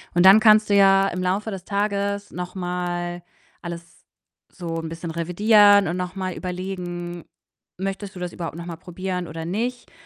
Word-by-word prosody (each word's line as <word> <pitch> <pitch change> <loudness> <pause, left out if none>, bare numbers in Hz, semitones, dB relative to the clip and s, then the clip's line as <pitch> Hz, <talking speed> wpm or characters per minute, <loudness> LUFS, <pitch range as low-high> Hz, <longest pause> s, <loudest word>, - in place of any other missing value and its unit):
und 175 +1 +4
dann 195 +3 +9
kannst 215 -1 +5
du - - +3
ja 195 0 +5
im 180 -1 -4
Laufe 195 +4 -1
des 190 -2 -6
Tages 200 0 -2
noch 180 +1 -6
mal 175 -1 -3 0.4
alles 170 -1 -9 0.5
so 165 -3 -5
'n 160 - -6
bisschen 165 0 -6
revidieren 205 +4 +5
und 170 - -2
noch 180 +1 -4
mal 185 -2 -3
überlegen: 180 -2 -5 0.5
Möchtest 195 +1 -4
du 180 - -8
das 180 -1 -5
überhaupt 165 -2 -5
noch 170 - -7
mal 170 - -5
probieren 180 +1 -5
oder 160 +1 -6
nicht? 235 +8 -3
180 Hz, 175 wpm, -23 LUFS, 175-200 Hz, 0.5 s, dann